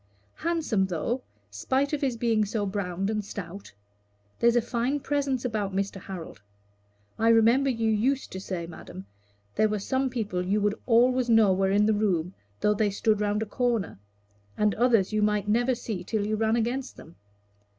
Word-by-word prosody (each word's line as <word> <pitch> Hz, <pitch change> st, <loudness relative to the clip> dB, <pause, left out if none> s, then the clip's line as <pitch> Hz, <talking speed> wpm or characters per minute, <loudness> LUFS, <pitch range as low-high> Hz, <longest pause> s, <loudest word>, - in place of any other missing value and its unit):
"Handsome, 315 Hz, -, 0 dB
though, 190 Hz, +8 st, -2 dB, 0.3 s
spite 265 Hz, -, -1 dB
of 300 Hz, -, -1 dB
his 260 Hz, -4 st, 0 dB
being 225 Hz, -2 st, +2 dB
so 210 Hz, 0 st, -2 dB
browned 195 Hz, -1 st, -2 dB
and 215 Hz, -1 st, -2 dB
stout. 200 Hz, -1 st, -8 dB, 0.7 s
There's 235 Hz, 0 st, +4 dB
a -, -, +6 dB
fine 245 Hz, +4 st, -1 dB
presence 275 Hz, -3 st, -1 dB
about 210 Hz, -5 st, -2 dB
Mr. 195 Hz, -1 st, -2 dB
Harold. 180 Hz, -, -8 dB, 0.8 s
I 225 Hz, -, +2 dB
remember 230 Hz, +4 st, +4 dB
you 225 Hz, -3 st, 0 dB
used 255 Hz, +6 st, 0 dB
to 190 Hz, -, -5 dB
say, 180 Hz, -3 st, -4 dB
madam, 95 Hz, -, -10 dB, 0.5 s
there 215 Hz, -, +2 dB
were 210 Hz, -, -1 dB
some 260 Hz, +6 st, -1 dB
people 210 Hz, -7 st, -2 dB
you 200 Hz, +3 st, +1 dB
would 205 Hz, 0 st, +1 dB
always 250 Hz, +1 st, +3 dB
know 220 Hz, -4 st, +5 dB
were 190 Hz, +1 st, +1 dB
in 205 Hz, +2 st, +3 dB
the 220 Hz, -, +3 dB
room 185 Hz, -4 st, 0 dB, 0.3 s
though 210 Hz, -, +3 dB
they 210 Hz, 0 st, +1 dB
stood 210 Hz, +1 st, +1 dB
round 210 Hz, +1 st, 0 dB
a -, -, -5 dB
corner, 230 Hz, -, -1 dB, 0.6 s
and 210 Hz, -1 st, +2 dB
others 225 Hz, -4 st, +2 dB
you 215 Hz, -, +1 dB
might 210 Hz, -1 st, +1 dB
never 240 Hz, +4 st, +2 dB
see 210 Hz, -6 st, -5 dB
till 210 Hz, +2 st, -2 dB
you 215 Hz, +1 st, 0 dB
ran 220 Hz, +1 st, +1 dB
against 245 Hz, +3 st, -2 dB
them. 165 Hz, -, -14 dB
215 Hz, 180 wpm, -27 LUFS, 195-240 Hz, 0.8 s, a